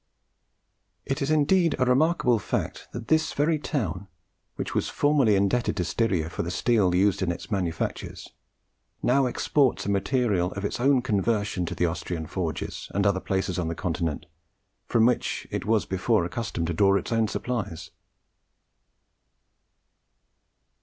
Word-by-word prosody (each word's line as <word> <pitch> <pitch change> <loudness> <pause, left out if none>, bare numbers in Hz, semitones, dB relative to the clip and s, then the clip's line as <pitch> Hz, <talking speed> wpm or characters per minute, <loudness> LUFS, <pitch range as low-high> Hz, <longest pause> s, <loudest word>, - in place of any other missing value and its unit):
It 135 - -2
is 140 - 0
indeed 155 +3 +3
a 130 - +2
remarkable 125 -2 +3
fact - - -3
that 120 -1 -7
this 160 0 +2
very 155 +2 +1
town, 100 - -3 0.5
which - - -4
was - - 0
formerly 145 -7 +3
indebted 100 +4 +1
to 90 - +1
Styria 90 -3 0
for 85 - -4
the 85 - -3
steel 95 0 +2
used 100 +2 +2
in 90 -2 +1
its 85 +5 -8
manufactures, 90 -5 -3 0.8
now 135 +1 +3
exports 135 +1 +1
a - - -2
material 100 -3 +1
of 100 +1 -4
its - - -3
own 130 0 +3
conversion 105 -4 0
to - - -4
the 90 - +1
Austrian 85 0 -3
forges 85 -1 -4
and 100 -1 +1
other 100 -2 +3
places 95 -1 -2
on 85 - -1
the 85 - -3
Continent 80 -4 -2 0.6
from 115 -1 +3
which 125 0 0
it - - -3
was 110 -1 +2
before 95 +1 +1
accustomed 90 -2 -3
to 85 - -2
draw 100 +3 +4
its 100 - -2
own 115 -1 +2
supplies. 105 -9 -4
100 Hz, 150 wpm, -26 LUFS, 90-125 Hz, 0.8 s, draw